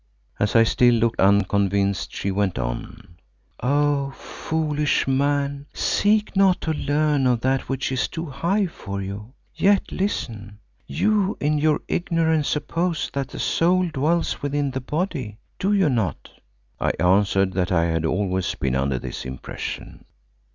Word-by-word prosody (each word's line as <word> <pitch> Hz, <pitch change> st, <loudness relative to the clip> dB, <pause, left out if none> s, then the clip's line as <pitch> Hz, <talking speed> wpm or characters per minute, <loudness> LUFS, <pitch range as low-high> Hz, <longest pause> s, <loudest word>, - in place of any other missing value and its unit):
As 105 Hz, +2 st, 0 dB
I 115 Hz, -, +7 dB
still 120 Hz, +2 st, +4 dB
looked 115 Hz, 0 st, 0 dB
unconvinced 100 Hz, 0 st, +2 dB
she 100 Hz, -, -2 dB
went 95 Hz, -4 st, 0 dB
on, 65 Hz, +7 st, -6 dB, 0.4 s
"Oh! 145 Hz, +1 st, +1 dB
foolish 150 Hz, -3 st, -1 dB
man, 140 Hz, +1 st, 0 dB
seek 210 Hz, 0 st, +1 dB
not 190 Hz, -2 st, +4 dB
to 160 Hz, -, -1 dB
learn 145 Hz, -2 st, +1 dB
of 120 Hz, -2 st, +2 dB
that 130 Hz, +1 st, 0 dB
which 135 Hz, 0 st, -2 dB
is 130 Hz, -1 st, 0 dB
too 165 Hz, 0 st, -5 dB
high 170 Hz, +8 st, 0 dB
for 100 Hz, -, -6 dB
you. 100 Hz, +5 st, -6 dB, 0.2 s
Yet 200 Hz, 0 st, +2 dB
listen. 110 Hz, -, -3 dB, 0.3 s
You 210 Hz, -1 st, +1 dB
in 150 Hz, +1 st, +1 dB
your 155 Hz, 0 st, +2 dB
ignorance 160 Hz, -3 st, +1 dB
suppose 165 Hz, +3 st, -1 dB
that 140 Hz, -2 st, -2 dB
the -, -, -10 dB
soul 180 Hz, +1 st, +2 dB
dwells 160 Hz, +3 st, 0 dB
within 145 Hz, -1 st, -1 dB
the 130 Hz, +1 st, -4 dB
body, 130 Hz, -, -3 dB, 0.2 s
do 195 Hz, -, +1 dB
you 195 Hz, -4 st, +3 dB
not?" 110 Hz, -, -1 dB, 0.5 s
I -, -, +1 dB
answered 95 Hz, +1 st, +3 dB
that 90 Hz, +1 st, -1 dB
I 85 Hz, -2 st, +3 dB
had 80 Hz, -1 st, 0 dB
always 95 Hz, +2 st, -1 dB
been 65 Hz, -1 st, -1 dB
under 65 Hz, 0 st, 0 dB
this -, -, -6 dB
impression. 65 Hz, 0 st, -7 dB
135 Hz, 145 wpm, -23 LUFS, 100-160 Hz, 0.5 s, I